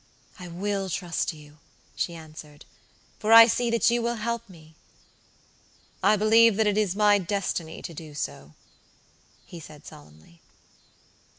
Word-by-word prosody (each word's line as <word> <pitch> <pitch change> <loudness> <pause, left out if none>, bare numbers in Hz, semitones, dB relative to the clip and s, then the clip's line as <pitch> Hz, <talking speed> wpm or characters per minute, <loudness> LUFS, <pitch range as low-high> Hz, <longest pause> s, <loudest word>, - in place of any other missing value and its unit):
"I 180 - -9
will 195 +2 -3
trust 175 -1 -2
you," 150 -1 -16 0.4
she 170 - -3
answered, 155 -2 -13 0.5
"for 215 0 -1
I 230 0 +10
see 235 +1 0
that 230 0 +2
you 240 0 0
will 235 +1 -2
help 235 0 -4
me." 160 -3 -17 1.3
"I 215 - +4
believe 220 +1 +4
that 220 +1 +1
it 205 -1 +1
is 205 -3 0
my 205 -1 +4
destiny 180 -4 -4
to 170 - -7
do 155 -1 -11
so," 70 - -6 0.9
he 175 - -11
said, 150 -2 -14
solemnly. 75 +3 -16
185 Hz, 140 wpm, -25 LUFS, 155-215 Hz, 1.3 s, I